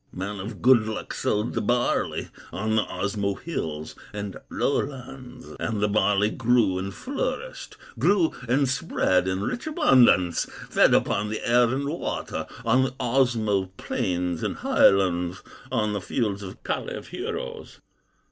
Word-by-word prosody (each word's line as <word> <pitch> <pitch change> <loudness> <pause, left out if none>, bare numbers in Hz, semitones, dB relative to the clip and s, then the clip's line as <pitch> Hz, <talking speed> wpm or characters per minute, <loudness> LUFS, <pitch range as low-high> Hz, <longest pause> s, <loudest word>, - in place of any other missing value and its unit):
"Man 100 +2 -5
of 105 +3 -7
good 120 -3 +6
luck 110 - -4
sowed 105 +3 -1
the - - -1
barley 120 +3 0 0.2
On 110 +4 -1
the 110 - +4
Osmo 100 +1 -2
hills 80 - -4 0.2
and 100 -2 -5
lowlands, 130 -2 -3
And 110 -2 -2
the 105 - +2
barley 105 0 +2
grew 115 -6 +2
and 95 +1 -4
flourished, 470 - -4 0.2
Grew 185 -5 +3 0.2
and 135 +2 +3
spread 110 - +1
in 95 +1 -1
rich 240 - -3
abundance, 125 - +4 0.3
Fed - - +5
upon 105 +1 +1
the 110 - -4
air 120 +1 +5
and 135 +3 -1
water, 155 +4 -3 0.2
On 120 +3 +4
the 130 - -3
Osmo 115 -6 +1
plains 90 -2 -2
and - - -2
highlands, 90 -2 +3 0.3
On 105 -4 +1
the 100 - -2
fields 105 0 -1
of 95 -2 -9
Kalew - - -3
heroes. - - -6
110 Hz, 140 wpm, -25 LUFS, 95-125 Hz, 0.3 s, good